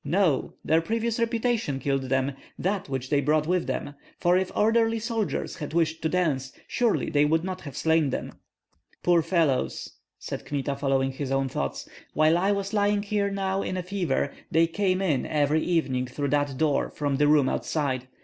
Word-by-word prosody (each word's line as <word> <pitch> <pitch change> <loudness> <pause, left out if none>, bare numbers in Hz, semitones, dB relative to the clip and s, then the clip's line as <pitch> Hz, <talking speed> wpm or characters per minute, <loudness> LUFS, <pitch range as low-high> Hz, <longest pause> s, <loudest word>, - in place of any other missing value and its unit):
No; 165 -2 +1
their 160 +1 +3
previous 230 +5 -1
reputation 230 - 0
killed 135 -1 -1
them, 135 +1 +1 0.3
that 190 -3 -2
which 130 0 -4
they 145 -1 +3
brought 150 +2 +2
with 180 +1 0
them; 145 - -3 0.3
for 175 0 +3
if 185 0 +1
orderly 225 +1 +3
soldiers 220 - -2
had 150 0 -6
wished 165 -1 +1
to 160 - 0
dance, 145 -8 0 0.2
surely 240 -3 +1
they 145 0 +4
would 160 +2 +2
not 185 0 -4
have 140 -3 -8
slain 160 -2 +2
them." - - -4 0.7
"Poor 175 -1 +4
fellows!" 160 -6 0 0.2
said - - -6
Kmita, 140 -1 -2
following 135 -1 +1
his 135 0 -5
own 135 0 +1
thoughts, - - -3 0.3
"while 155 +2 +4
I 190 +4 +2
was 200 0 -2
lying 205 -1 +2
here 205 -1 0
now 195 -1 -1
in 185 - -3
a 180 - -2
fever, 175 -7 -1 0.2
they 165 +1 +4
came 185 +2 0
in 150 -9 0
every 150 +1 +2
evening 135 -8 0
through 140 +3 -3
that 145 -1 0
door 150 -1 +1
from 145 -2 -2
the 145 +1 +3
room 145 -3 +5
outside. 130 -5 -1
160 Hz, 185 wpm, -26 LUFS, 140-195 Hz, 0.7 s, room